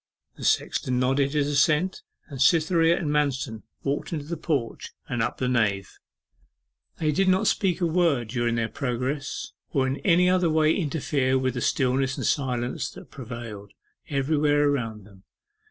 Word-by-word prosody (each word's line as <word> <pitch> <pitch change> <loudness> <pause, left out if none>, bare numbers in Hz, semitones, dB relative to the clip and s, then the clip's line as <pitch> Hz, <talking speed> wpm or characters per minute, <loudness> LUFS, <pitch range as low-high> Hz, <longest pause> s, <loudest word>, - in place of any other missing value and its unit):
The - - -10
sexton 125 -1 +1
nodded 135 +2 +1
his 150 -2 +2
assent, 150 +5 +2 0.3
and 135 -4 -7
Cytherea 165 +3 +4
and 155 -5 -2
Manston 135 -6 -1 0.2
walked 140 +1 -2
into 150 -4 -3
the 170 +3 -4
porch, 145 -7 -2 0.2
and 120 -2 -2
up 110 - -1
the 130 - -1
nave. 105 -6 0 1.1
They 155 -1 +1
did 190 +6 +1
not 185 +1 +3
speak 185 -2 +1
a - - +3
word 160 -9 +1
during 120 -1 0
their 115 -1 0
progress, 135 +3 -3 0.2
or 135 -2 +1
in 130 +1 -1
any 180 +2 +3
way 160 -4 +3
interfere 145 -5 0
with 130 -1 0
the 125 - -4
stillness 130 +1 +1
and - - -3
silence 125 -3 -1
that - - -13
prevailed 115 -5 -8 0.4
everywhere 145 +1 +2
around 115 -7 -2
them. 100 -2 -18
140 Hz, 155 wpm, -25 LUFS, 125-155 Hz, 1.1 s, Cytherea